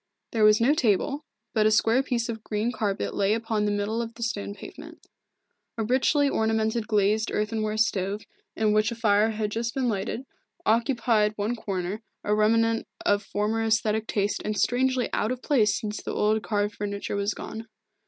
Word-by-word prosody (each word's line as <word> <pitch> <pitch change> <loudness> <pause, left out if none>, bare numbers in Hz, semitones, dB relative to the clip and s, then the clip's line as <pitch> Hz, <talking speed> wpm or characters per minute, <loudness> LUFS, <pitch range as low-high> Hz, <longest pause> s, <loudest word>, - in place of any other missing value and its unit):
There 225 -2 +1
was 215 0 +6
no 245 +5 +4
table, 280 +4 +1 0.3
but 215 -2 +3
a - - +5
square 225 +3 +3
piece 245 -4 -1
of 220 -2 -5
green 215 +3 -1
carpet 205 -5 -2
lay 200 +2 +2
upon 225 -2 -1
the 205 - +1
middle 205 +3 -1
of 230 0 -6
the 235 - -5
stone 205 -3 -3
pavement. 315 - -11 0.7
A 225 - 0
richly 265 +5 +2
ornamented 220 -2 0
glazed 215 +1 +2
earthenware 215 0 -1
stove, 205 -1 0 0.3
in 215 -1 +2
which 215 +2 +2
a - - -4
fire 215 -1 +3
had 215 -1 -2
just 230 +1 -2
been 265 -2 0
lighted, 215 +4 -2 0.4
occupied 230 -2 +2
one 210 +3 -1
corner, 195 -1 -4 0.2
a 210 - +1
remnant 225 +2 +2 0.2
of 205 0 +3
former 215 +2 -1
aesthetic 220 0 +1
taste 205 0 -1
and 215 -1 -2
strangely 255 0 +1
out 215 - 0
of 255 -1 -5
place 225 -8 +2
since 215 -2 -4
the - - -5
old 215 +1 +2
carved 205 -1 -1
furniture 200 0 -3
was 200 +1 -1
gone. 225 +1 -7
220 Hz, 180 wpm, -26 LUFS, 210-230 Hz, 0.7 s, was